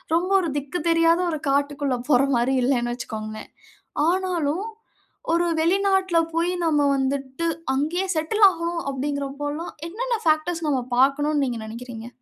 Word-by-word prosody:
ரொம்ப 350 +2 0
ஒரு 340 - -2
திக்கு 290 +5 -3
தெரியாத 330 +1 +4
ஒரு 310 - -3
காட்டுக்குள்ள 285 -1 0
போற 255 -2 +5
மாரி 250 +3 +1
இல்லைண்ணு 240 -2 +1
வச்சுகோங்களேன். 215 -2 -7 0.6
ஆனாலும் 365 -1 -1 0.7
ஒரு 340 +1 +2
வெளிநாட்டில 380 +1 +2 0.2
போயி 340 +2 +1
நம்ம 300 -2 +3
வந்துட்டு 270 +3 -2 0.3
அங்கயே 320 +8 0
செட்டில் 365 +8 +2
ஆகணும் 335 -1 -3
அப்படிங்கறபோல்லா 285 +3 -3 0.2
என்னென்ன 475 +7 -2
பேக்டர்ஸ் 315 +1 +1
நம்ம 270 -3 +1 0.2
பார்க்கணும்னு 285 +3 +3
நீங்க 240 -2 -3
நினைக்கிறீங்க? 230 0 -8
295 Hz, 130 wpm, -23 LUFS, 270-340 Hz, 0.7 s, போற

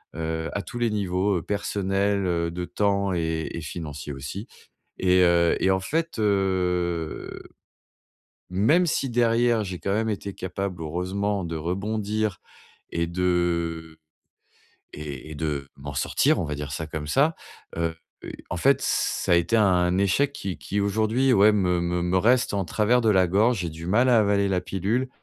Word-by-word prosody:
heu, 80 0 -3
à 100 - -2
tous 120 - -7
les 120 -1 +2
niveaux, 100 -1 0
heu, - - -3
personnel, 100 0 0
heu, 85 -2 0
de 90 +1 -4
temps 100 +1 0
et 80 -2 -1
et 85 - -5
financier 75 -2 -6
aussi 70 - -6 0.5
et 90 0 +3
heu 85 -1 +4
et 95 - +3
en 95 - +2
fait, 165 - -2
heu, 90 -5 -1 1.1
même 130 - +3
si 140 -4 0
derrière 120 -1 +2
j'ai 90 -2 -5
quand 100 - -1
même 110 +2 0
été 100 -2 -3
capable, 95 -1 -4
heureusement, 95 +5 -2
de 85 -1 -4
rebondir 105 +4 -2 0.5
et 85 0 -1
de 85 -2 -1 0.9
et 75 -1 -7
et - - -7
de 75 -3 -3
m'en 70 0 -8
sortir, - - +2
on - - -1
va 75 -1 -3
dire 70 0 -5
ça 80 +4 -4
comme 75 -1 -5
ça. 140 - +2 0.4
Heu 85 -1 0 0.3
heu, - - -6 0.2
en - - -2
fait, - - +3
ça - - 0
a - - +7
été 85 +7 +2
un 90 -4 +3
échec 100 +9 +2
qui 95 -9 -5
qui 100 - -2
aujourd'hui, 110 +6 +2
ouais, 105 -1 +6
me 90 -4 +1
me 85 0 -1
me 90 +1 +2
reste 120 +6 +3
en 100 -1 0
travers 110 +6 +2
de 115 - +1
la 95 -3 +4
gorge. 105 +4 +2
J'ai 85 -2 -3
du 80 +2 -8
mal 115 +8 +3
à 120 - +6
avaler 100 -1 +2
la 95 -2 +1
pilule, 105 +9 -1
95 Hz, 175 wpm, -25 LUFS, 85-105 Hz, 1.1 s, a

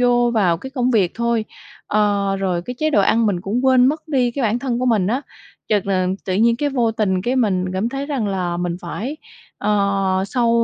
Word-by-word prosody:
vô 245 -1 +3
vào 180 -6 +3
cái 265 +9 -9
công 255 -2 0
việc 195 -7 +2
thôi. 235 -1 0 0.4
Ờ, 200 -2 +1
rồi 180 -3 -1
cái 250 +6 -6
chế 310 0 +1
độ 240 - +3
ăn 225 +3 +3
mình 185 -4 0
cũng 230 +8 -2
quên 255 -1 +5
mất 310 +3 -1
đi 255 -4 +1
cái 270 +2 -4
bản 225 +2 +1
thân 245 -2 -2
của 255 - -1
mình 210 -6 +2
á, 245 +6 0 0.5
chợt 205 -3 +1
là 185 -2 +1 0.2
tự 185 - -2
nhiên 230 +3 +3
cái 290 +2 0
vô 240 -5 +1
tình 190 -4 0
cái 250 +4 0
mình 195 -7 +1
cảm 195 +5 -1
thấy 275 +2 -4
rằng 265 -8 -2
là 180 -3 -2
mình 175 -1 -2
phải 265 +11 -5 0.4
ờ, 195 -2 +1
sau 240 -1 +1
220 Hz, 225 wpm, -20 LUFS, 195-250 Hz, 0.5 s, quên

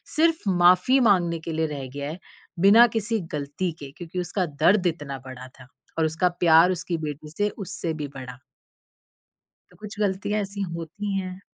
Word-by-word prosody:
सिर्फ़ 320 -8 +2
माफी 180 +8 +5
माँगने 170 -4 +2
के 165 - -2
लिए 160 0 0
रह 140 -3 -6
गया 145 0 -4
है, 170 - -8 0.4
बिना 220 +6 +7
किसी 225 +1 -1
गलती 145 +5 -3
के 140 -2 -9
क्योंकि 175 +1 -6
उसका 180 +1 -1
दर्द 175 +6 +2
इतना 150 -5 -4
बड़ा 130 -1 -9
था 125 - -14 0.3
और 160 - +2
उसका 160 +3 +1
प्यार 170 +1 +6
उसकी 175 -1 -3
बेटी 150 -1 -6
से 205 0 +1
उससे 190 -4 -4
भी 150 -2 -5
बड़ा। 125 -1 -9 1.3
तो - - -20
कुछ 210 0 -10
गलतियाँ 205 +1 0
ऐसी 200 +1 -7 0.2
होती 195 +5 -4
हैं। 185 0 -6
175 Hz, 170 wpm, -24 LUFS, 155-200 Hz, 1.3 s, बिना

